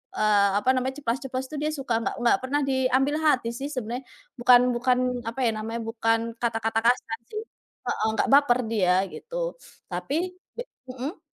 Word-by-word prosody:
eee, 205 -1 +4
apa 210 - 0
namanya 260 +1 -1
ceplas-ceplos, 260 0 -2
tuh, 305 - -5
dia 305 - 0
suka, 255 -5 -1
nggak - - -2
nggak 235 - +5
pernah 285 +3 0
diambil 265 +1 +2
hati, 250 -6 +3
sih, 275 +3 -4
sebenarnya. 245 -1 -3 0.4
Bukan 245 0 +7 0.2
bukan 250 +1 +2 0.3
apa 230 - -5
ya 230 - +3
namanya, 225 +2 -4
bukan 225 0 +1 0.2
kata-kata 225 -1 0
kasar 230 -2 +1
sih, 430 0 -4 0.5
heeh, - - 0
nggak - - +3
baper 275 -3 +5
dia, 185 -5 +3 0.2
gitu, - - -4 0.4
tapi 295 - -2 0.2
be 485 - -3 0.3
Mhm. 260 +8 -5
250 Hz, 165 wpm, -26 LUFS, 225-275 Hz, 0.5 s, Bukan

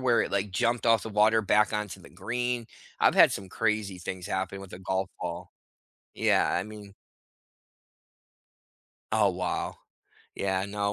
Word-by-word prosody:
where 120 -3 +3
it, - - -4
like, 100 +1 -1
jumped 115 +6 0
off 115 -1 +5
the - - -5
water 110 +1 +4
back 105 +1 +3
onto 105 -4 -3
the - - -14
green. 120 0 -2 0.3
I've - - +5
had - - +7
some 95 -1 -5
crazy 105 -4 -1
things 90 +1 -6
happen 95 0 -3
with 95 -1 -11
a 90 - -7
golf 95 0 -1
ball. 90 0 -5 0.6
Yeah, - - +3
I 90 - +1
mean 105 -2 -11 2.2
Oh, 105 -2 +4
wow. 90 0 -2 0.6
Yeah, 95 -1 0
no, 100 0 -1
100 Hz, 155 wpm, -28 LUFS, 95-110 Hz, 2.2 s, had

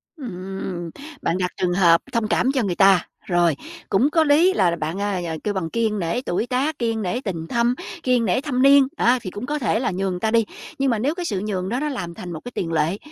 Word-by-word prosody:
Ừm, 190 - -6 0.3
bạn 170 - 0
đặt 180 -1 -1
trường 175 -1 +1
hợp 170 -3 +5
thông 230 -2 +1
cảm 255 +4 +2
cho 265 -3 0
người 185 -4 -1
ta, 195 -2 +5 0.2
rồi, 175 -4 +2 0.3
cũng 245 +9 +3
có 320 +1 +3
lý 315 +6 +4
là 175 - +2
bạn, 165 +4 -3
à, 200 -3 -1
à, 160 -1 -3
kêu 210 - -1
bằng 180 -4 -2
kiêng 220 -1 0
nể 180 +9 -1
tuổi 225 +1 -2
tác, 270 +5 -1
kiêng 225 -2 0
nể 215 +6 -2
tình 165 -7 -4
thâm, 235 +3 +1 0.3
kiêng 250 -2 +2
nể 195 +6 +1
thâm 265 -4 -1
niên, 275 -1 +7
đó, 245 +2 +4
thì 185 - -5
cũng 205 +5 -6
có 295 +1 -2
thể 225 -3 +1
là 245 - 0
nhường 185 -1 -2
ta 220 +2 0
đi. 230 -2 +3 0.3
Nhưng 275 0 +2
mà 225 - 0
nếu 285 +7 0
cái 355 -1 -4
sự 200 - -1
nhường 190 -2 -2
đó 245 - -1
nó 300 +1 -1
làm 190 -11 -4
thành 175 +1 -8
một 160 - -5
cái 245 - -6
tiền 165 -2 -2
lệ, 160 +4 +1
210 Hz, 250 wpm, -22 LUFS, 180-250 Hz, 0.3 s, niên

